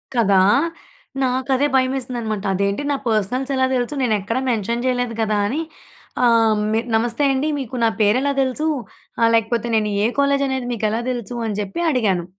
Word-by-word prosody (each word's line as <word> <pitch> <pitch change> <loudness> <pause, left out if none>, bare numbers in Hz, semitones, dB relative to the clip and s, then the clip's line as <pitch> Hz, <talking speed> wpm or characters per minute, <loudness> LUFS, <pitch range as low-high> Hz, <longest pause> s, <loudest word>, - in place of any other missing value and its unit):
కదా! 210 -4 +3 0.9
నాకు 260 +1 -1
అదే 285 +3 +2
భయమేసిందనమాట. 245 -5 -1
అదేంటి 200 +6 0
నా - - +1
పర్సనల్స్ 230 +6 0
ఎలా 260 0 +2
తెలుసు? 245 +3 -1
నేను 220 -3 +2
ఎక్కడ 230 +5 -2
మెన్షన్ 235 +2 -1
చేయలేదు 245 -2 0
కదా! 215 -1 +1
అని. 295 +9 -2 0.6
ఆహ్, 225 -2 +4 0.4
నమస్తే 235 +5 0
అండి, 270 +3 0
మీకు 255 -1 -6
నా 225 - +4
పేరు 210 +3 +4
ఎలా 280 0 0
తెలుసు? 265 +4 -1 0.7
లేకపోతే 230 +1 0
నేను 215 -1 +1
ఏ - - +3
కాలేజ్ 280 0 +2
అనేది 260 -2 -2
మీకు 220 -1 -3
ఎలా 230 +2 -1
తెలుసు? 240 -1 -5
అని 210 -1 -3
చెప్పి 200 - -5
అడిగాను. 200 - +1
235 Hz, 165 wpm, -20 LUFS, 215-260 Hz, 0.9 s, ఆహ్